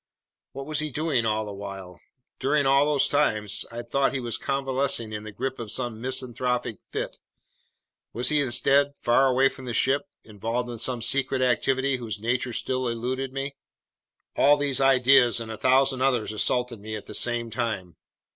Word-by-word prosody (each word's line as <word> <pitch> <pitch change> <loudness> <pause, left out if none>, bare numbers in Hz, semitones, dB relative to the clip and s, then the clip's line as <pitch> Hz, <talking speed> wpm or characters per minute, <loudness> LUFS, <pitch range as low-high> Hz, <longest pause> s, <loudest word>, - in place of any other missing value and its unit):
What 135 0 -6
was 155 0 0
he 155 0 0
doing 145 -5 0
all 110 0 0
the 105 - -7
while? 95 -2 -8 0.4
During 145 +2 +1
all 135 +2 +4
those 145 -2 +2
times 110 -8 +1
I'd 120 0 -7
thought 140 +2 +1
he - - 0
was 120 -2 -3
convalescing 135 -4 -1
in 105 0 -5
the 110 - -7
grip 130 +5 -4
of 115 -3 -6
some 120 -3 -3
misanthropic 125 -3 -2
fit, - - -4 0.9
was 125 +2 0
he 150 -1 +3
instead 140 +3 +2
far 120 +3 +3
away 130 +1 +4
from 135 -1 -7
the 120 -2 -3
ship, 135 +4 +2
involved 115 +3 -4
in 115 - -7
some 120 0 -1
secret 130 +2 +1
activity 130 +2 +1
whose 110 -4 -5
nature 120 +3 -1
still 130 +2 -2
eluded 125 +3 -3
me? 135 +1 -4 0.8
All 145 +1 +5
these 140 -2 +1
ideas 130 -2 +5
and 115 -1 -6
a - - -4
thousand 130 +1 +3
others 125 -5 +1
assaulted 125 +1 +1
me 110 +1 -6
at 105 - -7
the - - -9
same 120 -1 -1
time. 110 -7 -3
125 Hz, 175 wpm, -25 LUFS, 115-135 Hz, 0.9 s, All